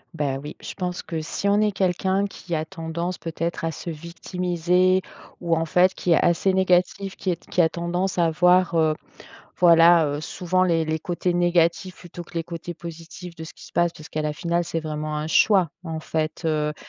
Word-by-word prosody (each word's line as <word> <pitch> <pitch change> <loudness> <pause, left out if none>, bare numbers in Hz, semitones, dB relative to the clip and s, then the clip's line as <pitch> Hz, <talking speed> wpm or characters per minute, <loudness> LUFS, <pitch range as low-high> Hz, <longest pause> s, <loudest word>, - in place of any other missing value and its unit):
Bah, 140 -4 -1
oui, 150 +2 -8
je - - -7
pense 180 -1 -4
que 160 -2 -4
si 170 +5 -3
on 205 +1 +3
est 210 - +2
quelqu'un 190 +1 0
qui 180 -3 -5
a 155 0 -2
tendance 170 +1 -4
peut-être 165 +1 -4
à 165 - 0
se 170 - -6
victimiser, 180 +2 0 0.4
ou 170 -2 +1
en 165 0 0
fait 180 +3 +3
qui 180 - -2
est 165 - +4
assez 175 +3 +2
négatif, 190 +1 +1
qui 190 - -3
est 175 - +1
t - - -25
qui 180 - +3
a 160 - +4
tendance 175 +3 -2
à 170 -2 +3
voir, 180 +2 +4
heu, 160 -1 +3 0.6
voilà, 170 -1 +6
heu, 145 0 -2
souvent 185 +3 0
les 165 -3 +2
les 155 0 -1
côtés 175 +2 -2
négatifs 175 +1 +1
plutôt 175 0 -10
que - - -18
les 165 -1 -2
côtés 170 +1 -7
positifs 170 +1 -9
de 160 - -7
ce 160 - -11
qui - - -14
se - - -15
passe. 175 -1 +2
Puisque 155 0 -8
à 155 - 0
la 150 0 -2
finale, 170 +2 -1
c'est 165 0 -3
vraiment 155 -1 -4
un 150 +1 -3
choix 185 0 +4
en 160 -2 -5
fait, 155 +1 -3
heu, 150 -1 0
170 Hz, 215 wpm, -24 LUFS, 160-180 Hz, 0.6 s, voilà